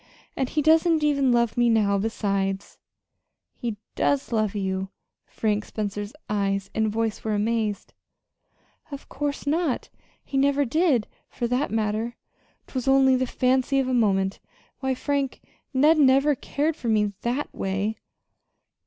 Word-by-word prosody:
"And 265 Hz, -2 st, -1 dB
he 300 Hz, -, 0 dB
doesn't 320 Hz, 0 st, +4 dB
even 280 Hz, -3 st, +3 dB
love 235 Hz, -2 st, +2 dB
me 240 Hz, 0 st, +4 dB
now, 205 Hz, -3 st, +3 dB
besides." 195 Hz, -2 st, -2 dB, 0.7 s
"He 230 Hz, -3 st, -4 dB, 0.2 s
doesn't 275 Hz, -4 st, 0 dB
love 215 Hz, -2 st, 0 dB
you!" 190 Hz, -1 st, -2 dB, 0.4 s
Frank 210 Hz, -1 st, -1 dB
Spencer's 205 Hz, -1 st, -4 dB, 0.2 s
eyes 195 Hz, -1 st, -1 dB
and 220 Hz, -1 st, +1 dB
voice 225 Hz, 0 st, -2 dB
were 215 Hz, -1 st, 0 dB
amazed. 215 Hz, -1 st, -1 dB, 1.0 s
"Of 280 Hz, -1 st, -8 dB
course 290 Hz, -1 st, -3 dB
not! 305 Hz, -1 st, 0 dB, 0.3 s
He 275 Hz, -, -4 dB
never 280 Hz, +1 st, +3 dB
did, 275 Hz, -, +2 dB, 0.2 s
for 240 Hz, -, -3 dB
that 255 Hz, +4 st, 0 dB
matter. 220 Hz, +2 st, -1 dB, 0.5 s
'Twas 255 Hz, -1 st, -5 dB
only 270 Hz, -1 st, +5 dB
the 255 Hz, 0 st, 0 dB
fancy 260 Hz, +2 st, +1 dB
of 265 Hz, -1 st, +1 dB
a 260 Hz, -, 0 dB
moment. 195 Hz, -5 st, +1 dB, 0.4 s
Why, 265 Hz, -1 st, -1 dB
Frank, 280 Hz, 0 st, -2 dB, 0.3 s
Ned 300 Hz, +4 st, +4 dB
never 275 Hz, +1 st, +5 dB
cared 290 Hz, +4 st, -1 dB
for 245 Hz, -, -6 dB
me 210 Hz, -2 st, +2 dB
that 250 Hz, +5 st, -2 dB
way!" 195 Hz, +3 st, -2 dB
240 Hz, 140 wpm, -25 LUFS, 210-275 Hz, 1.0 s, only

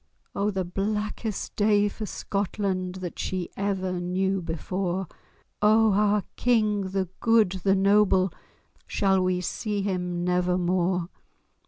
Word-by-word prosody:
O 200 Hz, +1 st, 0 dB
the 190 Hz, -3 st, -2 dB
blackest 210 Hz, +3 st, -3 dB
day 205 Hz, -1 st, +3 dB
for 210 Hz, +1 st, -5 dB
Scotland 190 Hz, -2 st, -2 dB
That 185 Hz, -2 st, -6 dB
she 185 Hz, -2 st, -2 dB
ever 190 Hz, -2 st, -1 dB
knew 190 Hz, +2 st, 0 dB
before! 180 Hz, +3 st, -2 dB, 0.6 s
O 215 Hz, 0 st, +5 dB
our 210 Hz, 0 st, +2 dB
King—the 205 Hz, -5 st, +1 dB
good, 225 Hz, -5 st, +4 dB
the 195 Hz, -1 st, +4 dB
noble, 195 Hz, -2 st, +3 dB, 0.5 s
Shall 190 Hz, -2 st, +2 dB
we 185 Hz, 0 st, +1 dB
see 205 Hz, +3 st, -2 dB
him 180 Hz, -3 st, -2 dB
never 180 Hz, 0 st, +1 dB
more? 180 Hz, 0 st, 0 dB
195 Hz, 120 wpm, -26 LUFS, 180-205 Hz, 0.6 s, O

